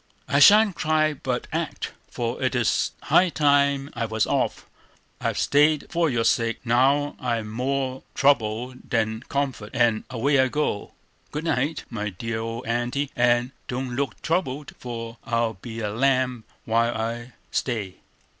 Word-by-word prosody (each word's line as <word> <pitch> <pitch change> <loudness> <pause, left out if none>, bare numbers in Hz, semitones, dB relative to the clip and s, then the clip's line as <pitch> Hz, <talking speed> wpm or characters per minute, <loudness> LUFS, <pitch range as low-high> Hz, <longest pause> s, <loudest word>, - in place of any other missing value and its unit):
"I 140 - +2
shan't 205 +6 +7
cry 155 0 +2
but 130 -3 -3
act; - - -3 0.2
for 120 +2 -3
it 130 0 0
is 120 -2 +1
high 185 0 +4
time 140 -2 +2
I 115 - -2
was 110 0 0
off. - - -1 0.5
I've - - -1
stayed 150 +1 +3
for 170 -2 +2
your 120 -4 0
sake; 115 0 +2
now 135 +5 +3
I'm 115 -3 -2
more 130 +2 -2
trouble 125 -3 +2 0.2
than 110 -2 0
comfort, 135 -7 -2
and 115 -2 +2
away 135 +3 +2
I 130 - +5
go. 150 -7 -2 0.4
Good 150 +2 -4
night, 145 0 0
my 105 -1 -3
dear 110 +4 -4
old 115 +2 -5
Aunty, 120 +4 -1
and 120 +1 +2 0.2
don't 125 0 -3
look 140 -2 -2
troubled, 150 -5 -1
for 115 -1 -6
I'll 115 -1 0
be 115 +3 -8
a 105 -1 -2
lamb 130 -1 +1 0.2
while 115 +1 +1
I 115 +2 -4 0.2
stay." 110 -7 -2
125 Hz, 150 wpm, -24 LUFS, 115-140 Hz, 0.5 s, shan't